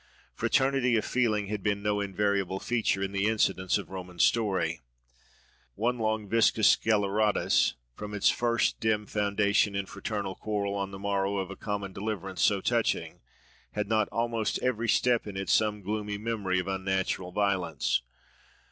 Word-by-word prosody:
Fraternity 130 -2 +2
of 110 - -1
feeling 110 -5 +1
had 105 0 -4
been 100 +1 -1
no 105 0 +1
invariable 100 -1 0
feature 110 -5 0
in 95 - -2
the 100 +1 0
incidents 95 -4 +1
of 100 - -8
Roman 90 -2 -8
story. 95 -7 +1 0.9
One 120 +3 0
long 110 -1 -1
Vicus 115 0 +4
Sceleratus, 105 -1 +2 0.2
from 105 +8 -7
its 100 - +4
first 120 -1 +1
dim 110 -1 +1
foundation 100 0 +1
in 100 0 -1
fraternal 100 -1 -4
quarrel 100 -1 -2
on 100 -1 -2
the 95 - -8
morrow 100 0 -1
of 95 0 -3
a - - -6
common 100 -2 -4
deliverance 95 -2 -4
so 100 -2 +3
touching—had 105 - -3
not 110 -1 +1
almost 115 -1 -1
every 120 -2 0
step 120 0 +2
in 100 -2 -6
it 95 - -4
some 105 -1 +2
gloomy 105 +1 -3
memory 105 -4 -1
of 90 - -4
unnatural 95 -1 -1
violence? 90 -11 0
105 Hz, 150 wpm, -28 LUFS, 95-110 Hz, 0.9 s, Vicus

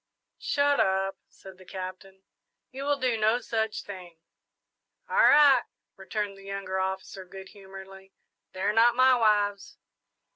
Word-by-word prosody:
"Shut 285 0 +1
up," 190 0 +1
said 190 -1 -15
the - - -14
Captain; 190 +1 -9 0.5
"you 270 +2 -7
will 290 0 +1
do 250 -4 -1
no 220 +3 +2
such 220 -3 -3
thing!" 180 -4 -11 0.9
"All 475 - -4
right," 295 - +6 0.3
returned 205 -2 -5
the 195 - -15
younger 195 -1 -4
officer, 190 0 -4
good 190 +1 -12
humouredly, 195 -1 -13 0.4
"they're 195 +3 -1
not 230 +2 +4
my 255 +1 +5
wives!" 205 -3 0
195 Hz, 135 wpm, -27 LUFS, 190-230 Hz, 0.9 s, right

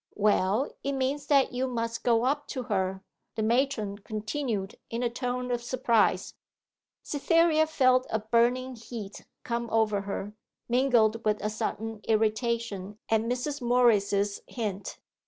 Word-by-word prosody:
'Well, 210 +4 +2
it 280 - -1
means 275 +2 -1
that 275 -3 +4
you 255 +1 0
must 230 -2 -3
go 235 -1 +3
up 290 +2 0
to 260 -3 -4
her,' 190 -3 -1 0.3
the 220 - -1
matron 225 -4 0
continued, 215 -1 -3
in 230 +2 -2
a 240 - 0
tone 250 0 -3
of 240 -1 0
surprise. 240 -2 +1 0.7
Cytherea 315 +1 +3
felt 255 -4 +3
a 220 - +1
burning 240 +4 +1
heat 220 -3 -8 0.2
come 235 0 -2
over 215 -2 +2
her, 200 +1 -5 0.3
mingled 235 -3 +3
with 210 -1 +1
a 210 - 0
sudden 220 0 -4
irritation 220 -2 0
at 220 -1 +3
Mrs. 250 +5 -2
Morris's 205 -5 +2
hint. 205 -5 -4
235 Hz, 135 wpm, -28 LUFS, 215-255 Hz, 0.7 s, that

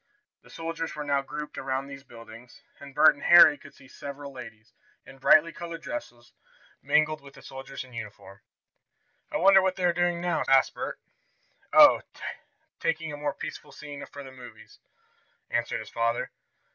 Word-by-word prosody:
The - - -20
soldiers 165 0 -5
were 150 - -4
now 140 -1 +1
grouped 150 +2 -7
around 135 0 -2
these 140 0 -10
buildings, 115 -1 -14 0.2
and 140 -1 -12
Bert 155 - +7
and 140 - -17
Harry 175 -3 +8
could - - -16
see 135 - -17
several 140 +1 -9
ladies, 115 -3 -12 0.3
in 135 - -14
brightly 155 +4 +5
colored 170 -1 -8
dresses, 120 - -8 0.5
mingled 155 0 +2
with 140 0 -15
the - - -15
soldiers 135 0 -8
in 130 -1 -17
uniform. 105 -3 -10 0.9
"I - - -1
wonder 195 +1 +6
what 190 0 0
they 185 - -5
are 175 - +3
doing 175 0 0
now?" 175 -1 -1
asked 135 0 +4
Bert. - - -5 0.7
"Oh, 300 -1 +8 0.8
taking 160 -2 -2
a - - -6
more 145 -1 -3
peaceful - - -8
scene 145 -1 -9
for 145 - -10
the 135 - -11
movies," 125 -4 -14 0.7
answered 120 0 -1
his 110 - -10
father. 115 0 -1
140 Hz, 170 wpm, -27 LUFS, 125-165 Hz, 0.9 s, Harry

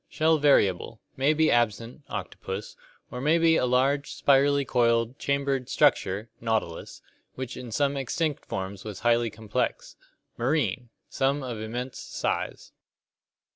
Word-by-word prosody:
Shell 160 0 +2
variable; 110 -7 +2 0.2
may 135 +3 +3
be 155 0 +3
absent 115 +3 0
(octopus), 95 0 -6 0.4
or 125 - -5
may 155 +4 +3
be 165 -1 +4
a 125 - +2
large, 135 +3 +1
spirally 140 0 +3
coiled, 115 0 +1
chambered 140 -2 -1
structure 110 -8 +2
(nautilus) 110 -7 -3 0.3
which 130 -1 -5
in 120 -2 -8
some 140 +4 +1
extinct 140 +3 -2
forms 95 0 -5
was 105 -3 -7
highly 120 0 +3
complex. 110 0 -3 0.4
Marine. 130 -1 0 0.2
Some 135 +1 0
of 120 -4 -5
immense 120 +4 -5
size. - - -3
125 Hz, 130 wpm, -27 LUFS, 110-140 Hz, 0.4 s, be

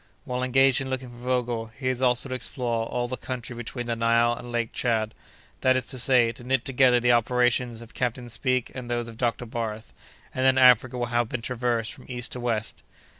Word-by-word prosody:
While 125 -3 -3
engaged 135 +1 +4
in 135 - -4
looking 130 -1 -4
for 120 - -13
Vogel, 120 -2 -1
he 135 -2 -4
is 130 0 0
also 125 +1 +2
to 130 - -5
explore 120 -2 -1
all 120 0 -2
the 130 +1 -4
country 125 -1 -6
between 120 +1 -5
the 115 0 -2
Nile 115 +1 +3
and 120 0 -8
Lake 120 -1 -2
Tchad, 110 -3 0 0.5
that 130 0 +3
is 130 - -1
to 130 - 0
say, 120 -1 +5
to 120 - -12
knit 130 0 0
together 125 -2 +4
the 120 0 +3
operations 120 0 +1
of 115 0 -13
Captain 125 0 -2
Speke 130 +2 -1
and 125 -2 -7
those 120 -1 -2
of 115 - -9
Dr. 120 0 -1
Barth, 110 -2 -5 0.4
and 130 - -1
then 130 0 +4
Africa 125 0 +5
will 120 - -1
have 120 -1 +1
been 120 -3 -4
traversed 120 -2 -1
from - - -14
east 125 -1 -3
to 125 - -5
west." 115 -3 -2
120 Hz, 220 wpm, -26 LUFS, 115-130 Hz, 0.5 s, say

